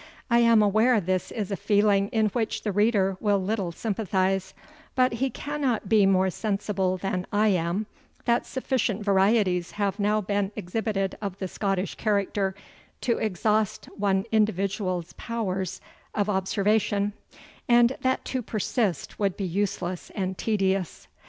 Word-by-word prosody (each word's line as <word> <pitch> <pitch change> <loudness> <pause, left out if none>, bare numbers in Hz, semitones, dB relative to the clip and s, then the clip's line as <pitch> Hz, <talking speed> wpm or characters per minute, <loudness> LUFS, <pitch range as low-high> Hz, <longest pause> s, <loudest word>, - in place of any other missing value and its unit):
I 235 - +5
am 230 -2 +5
aware 220 +4 +4
this 185 0 -1
is 210 -3 -4
a - - 0
feeling 205 0 +3
in 220 0 +1
which 220 +1 -2
the 210 - -1
reader 200 -2 +2
will 205 -2 +2
little 195 -2 -1
sympathize; 195 -1 -1 0.4
but 255 -1 +3
he 260 +4 0
cannot 285 -4 -2
be 210 -3 +5
more 190 -1 +3
sensible 195 -2 -1
than 185 -1 -3
I 210 +1 +3
am, 180 +2 0 0.4
that 235 0 +1
sufficient 240 -6 -1
varieties 195 -3 +2
have 200 0 -1
now 210 +1 +2
been 200 0 -1
exhibited 195 +1 -2
of 195 -3 -4
the 190 - -3
Scottish 195 0 -2
character, 200 -2 0 0.5
to 235 -2 0
exhaust 215 +1 0
one 195 -1 +1
individual's 195 -4 0
powers 190 -6 -3 0.4
of 210 0 +1
observation, 205 +1 +1 0.6
and 240 +1 +5
that 260 0 0
to 260 - -2
persist 215 - -2
would 200 -3 0
be 195 - -2
useless 185 -1 -2
and 190 -2 -2
tedious. 195 -4 -1
205 Hz, 140 wpm, -26 LUFS, 190-220 Hz, 0.6 s, I